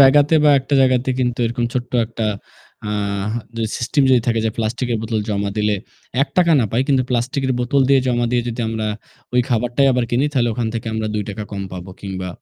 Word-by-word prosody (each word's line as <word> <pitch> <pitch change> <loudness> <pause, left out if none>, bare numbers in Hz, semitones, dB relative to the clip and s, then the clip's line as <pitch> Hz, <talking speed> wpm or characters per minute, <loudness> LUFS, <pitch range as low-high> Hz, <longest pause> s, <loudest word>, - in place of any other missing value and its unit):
জায়গাতে 145 +3 +6
বা 150 - +7
১ 130 - -7
টা - - +3
জায়গাতে 130 0 +3
কিন্তু 120 -1 0
এরকম 120 +1 -2
ছোট্ট 125 -1 -2
১ 110 - -13
টা 110 - +1 0.6
আ - - -2 0.7
যদি 115 -1 -1
সিস্টেম 125 +4 +1
যদি 125 -2 +5
থাকে 115 -1 +2
যে - - +1
প্লাস্টিকের 115 +1 -1
বোতল 110 -1 -1
জমা 100 -1 -1
দিলে 105 0 +2 0.5
৳১ 170 +3 +2
না - - +2
পাই 120 - +2
কিন্তু 135 -2 +3
প্লাস্টিকের 130 +2 0
বোতল 135 +3 +1
দিয়ে 135 -1 +5
জমা 120 -1 +1
দিয়ে 120 -1 +1
যদি 120 +1 -4
আমরা 110 -1 -2 0.5
ওই 125 - +5
খাবারটাই 120 +3 +2
আবার 125 -1 +1
কিনি। 125 +4 +2
তাহলে 120 -4 +2
ওখান 115 0 -1
থেকে 115 - -4
আমরা 110 0 -1
৳২ 105 0 -3
কম 100 -1 -3
পাবো 90 +1 -7
কিংবা 95 -2 -5
120 Hz, 210 wpm, -20 LUFS, 110-130 Hz, 0.7 s, বা